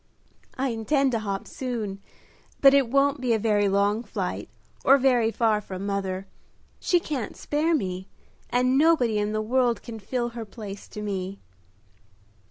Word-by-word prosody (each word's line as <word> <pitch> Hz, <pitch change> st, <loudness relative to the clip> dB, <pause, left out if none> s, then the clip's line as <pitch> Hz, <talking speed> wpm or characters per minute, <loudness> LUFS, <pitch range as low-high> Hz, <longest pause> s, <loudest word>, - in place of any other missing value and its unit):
"I 265 Hz, +1 st, 0 dB
intend 265 Hz, +4 st, +1 dB
to 230 Hz, -, 0 dB
hop 200 Hz, -2 st, -4 dB
soon, 220 Hz, -7 st, -4 dB, 0.6 s
but 275 Hz, -1 st, +7 dB
it 275 Hz, -4 st, +4 dB
won't 275 Hz, +1 st, +2 dB
be 245 Hz, -3 st, +2 dB
a -, -, +2 dB
very 205 Hz, -2 st, +2 dB
long 200 Hz, +3 st, +2 dB
flight -, -, -4 dB, 0.3 s
or 275 Hz, -, +7 dB
very 250 Hz, -4 st, +3 dB
far 220 Hz, -2 st, +1 dB
from 190 Hz, -1 st, -6 dB
mother. 195 Hz, -1 st, -2 dB, 0.5 s
She 350 Hz, -, +2 dB
can't 285 Hz, -9 st, -4 dB
spare 315 Hz, +3 st, +1 dB
me, 185 Hz, -7 st, -3 dB, 0.4 s
and 255 Hz, +2 st, +2 dB
nobody 260 Hz, -9 st, +3 dB
in 210 Hz, 0 st, -1 dB
the 215 Hz, 0 st, -1 dB
world 245 Hz, +1 st, +1 dB
can 225 Hz, -2 st, -7 dB
fill 240 Hz, +4 st, -2 dB
her 235 Hz, -1 st, -6 dB
place 205 Hz, -2 st, -9 dB
to 210 Hz, -, -7 dB
me." 195 Hz, -1 st, -4 dB
225 Hz, 160 wpm, -26 LUFS, 205-260 Hz, 0.6 s, but